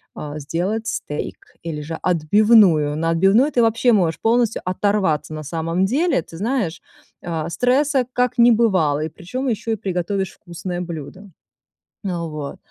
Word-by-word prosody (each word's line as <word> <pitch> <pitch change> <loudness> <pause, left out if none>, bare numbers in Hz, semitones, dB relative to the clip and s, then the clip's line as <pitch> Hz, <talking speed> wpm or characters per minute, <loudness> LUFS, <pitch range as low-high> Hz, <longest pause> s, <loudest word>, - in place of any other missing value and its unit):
а, 150 0 -6
сделать 185 +10 -2
стейк, 150 - -5 0.2
или 160 -3 -4
же 160 +2 -6
отбивную. 175 -3 +4
На 165 +1 0
отбивную 195 - +4
ты 240 - +2
вообще 230 +2 +3
можешь 175 -6 +1
полностью 230 0 +1
оторваться, 185 -5 0
на 155 - -6
самом 165 +4 -1
деле. 285 - +1
Ты 165 - -12
знаешь, 210 -6 -2 0.4
э, 165 -2 -3
стресса 260 - +2
как 250 0 0
не 235 +1 +7
бывало, 185 -11 +2
и 160 - -4
причём 255 - -5
ещё 225 0 -2
и - - 0
приготовишь 190 -1 -2
вкусное 175 +1 -6
блюдо. 175 +3 -8 0.8
А, 175 -3 -2
вот, 150 -3 -6
185 Hz, 150 wpm, -21 LUFS, 165-225 Hz, 0.8 s, не